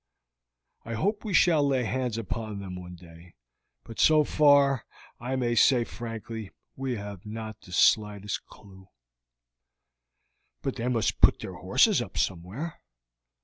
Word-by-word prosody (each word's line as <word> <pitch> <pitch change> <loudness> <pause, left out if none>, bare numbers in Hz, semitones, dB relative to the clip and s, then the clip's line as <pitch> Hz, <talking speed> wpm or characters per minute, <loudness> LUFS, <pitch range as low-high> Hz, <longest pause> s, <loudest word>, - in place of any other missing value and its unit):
I 115 0 -5
hope 205 - -1
we 215 - -4
shall 160 -4 +5
lay 135 -3 +1
hands 125 -1 -2
upon 110 -1 -4
them 95 -2 -7
one 90 0 -9
day, 85 0 -16 0.5
but 115 +3 -11
so 155 -1 +5
far 140 -3 +4 0.4
I 125 +3 -3
may 120 -2 0
say 120 +1 +4
frankly 115 -2 -7 0.3
we 130 -2 -3
have 100 -3 -8
not 110 0 -7
the 90 - -15
slightest 105 +1 +1
clew." 95 -1 -16 1.8
"But 135 - -3
they 120 +1 -2
must 115 -4 0
put - - +5
their - - -6
horses - - +3
up - - -7
somewhere?" 95 - -3
115 Hz, 140 wpm, -27 LUFS, 100-130 Hz, 1.8 s, shall